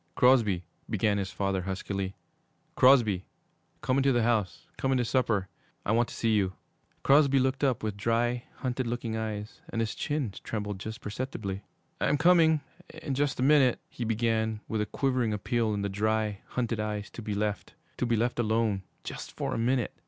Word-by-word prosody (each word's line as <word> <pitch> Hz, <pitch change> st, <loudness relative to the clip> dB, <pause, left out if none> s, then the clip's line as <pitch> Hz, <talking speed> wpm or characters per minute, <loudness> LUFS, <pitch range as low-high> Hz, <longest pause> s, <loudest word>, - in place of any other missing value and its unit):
'Crosby,' 115 Hz, -8 st, +4 dB, 0.3 s
began 105 Hz, -1 st, +1 dB
his 95 Hz, -1 st, -2 dB
father 95 Hz, -1 st, -1 dB
huskily, 95 Hz, +1 st, -3 dB, 0.6 s
'Crosby, 120 Hz, -8 st, +5 dB, 0.6 s
come 130 Hz, -, +1 dB
into 135 Hz, 0 st, +4 dB
the 120 Hz, -2 st, +2 dB
house, 110 Hz, -5 st, 0 dB
come 135 Hz, -, -1 dB
in 130 Hz, -, +3 dB
to 120 Hz, -, +1 dB
supper, 115 Hz, -6 st, +1 dB, 0.4 s
I -, -, +1 dB
want 120 Hz, +1 st, +2 dB
to -, -, -8 dB
see 115 Hz, -1 st, +1 dB
you.' 95 Hz, -3 st, +2 dB, 0.5 s
Crosby 140 Hz, 0 st, +5 dB
looked 130 Hz, +1 st, +1 dB
up 130 Hz, -6 st, +1 dB
with 105 Hz, -2 st, -2 dB
dry, 120 Hz, +3 st, 0 dB
hunted 130 Hz, -1 st, -2 dB
looking 115 Hz, -1 st, -2 dB
eyes, 110 Hz, +2 st, -4 dB
and 115 Hz, -, -3 dB
his 115 Hz, -2 st, 0 dB
chin 145 Hz, -9 st, -2 dB
trembled 105 Hz, -3 st, -4 dB
just 110 Hz, +3 st, -6 dB
perceptibly. 105 Hz, -3 st, -4 dB, 0.4 s
'I'm -, -, +2 dB
coming 160 Hz, -1 st, +5 dB, 0.4 s
in 140 Hz, -, -2 dB
just 140 Hz, 0 st, 0 dB
a -, -, +2 dB
minute,' 135 Hz, -3 st, +5 dB
he 120 Hz, -, -5 dB
began, 110 Hz, -1 st, 0 dB
with 110 Hz, -1 st, -1 dB
a 105 Hz, -, -1 dB
quivering 130 Hz, -5 st, 0 dB
appeal 110 Hz, +2 st, 0 dB
in 100 Hz, -1 st, -1 dB
the -, -, 0 dB
dry, 105 Hz, +1 st, 0 dB
hunted 120 Hz, -3 st, -2 dB
eyes 105 Hz, -1 st, -3 dB
to -, -, -8 dB
be 105 Hz, -2 st, -3 dB
left 105 Hz, 0 st, -2 dB, 0.2 s
to 125 Hz, -, 0 dB
be 120 Hz, -, +2 dB
left 120 Hz, +2 st, 0 dB
alone 110 Hz, -3 st, +1 dB, 0.2 s
just -, -, -6 dB
for -, -, -3 dB
a -, -, -1 dB
minute! 125 Hz, 0 st, +1 dB
115 Hz, 180 wpm, -29 LUFS, 105-125 Hz, 0.6 s, Crosby